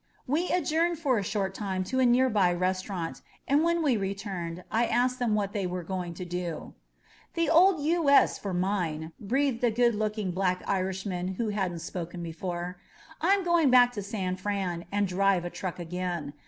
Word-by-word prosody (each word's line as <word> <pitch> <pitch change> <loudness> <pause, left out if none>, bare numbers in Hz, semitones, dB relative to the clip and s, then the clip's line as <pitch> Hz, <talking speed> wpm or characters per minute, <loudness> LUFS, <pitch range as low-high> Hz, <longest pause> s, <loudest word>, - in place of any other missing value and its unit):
We 315 +7 0
adjourned 340 -1 +1
for 270 -7 +1
a - - -3
short 195 -1 -2
time 190 -2 -2
to 260 +7 -2
a 255 - +5
nearby 230 -8 +3
restau 185 +2 -1
rant, 170 -4 -4 0.3
and 285 +3 +3
when 340 0 +2
we 265 -6 +3
returned 190 -3 -4
I 230 +1 +2
asked 250 +2 +1
them 235 -4 +1
what 200 -1 -1
they 195 -3 -1
were 180 0 -4
going 180 -1 -4
to 180 - -6
do. 175 -2 -5 0.6
The 335 -2 +1
old 350 +1 +6
U. 325 -1 +2
S. 280 - +5
for 200 - -4
mine,'' 175 -4 -1
breathed 255 +3 0
a 240 - +5
good 235 +1 +3
looking 210 -2 -2
black 185 0 0
Irishman 190 -1 -2
who 225 +2 -1
hadn't 185 -5 -2
spoken 175 0 -5
before. 175 +2 -5 0.4
"I'm 385 +4 +3
going 340 -5 +3
back 245 -1 +6
to 215 -4 -5
San 190 -2 -3
Fran 185 -3 -2
and 205 0 +1
drive 190 -1 +2
a 175 - -4
truck 185 -3 -5
again. 175 -3 -4
195 Hz, 185 wpm, -28 LUFS, 180-245 Hz, 0.6 s, old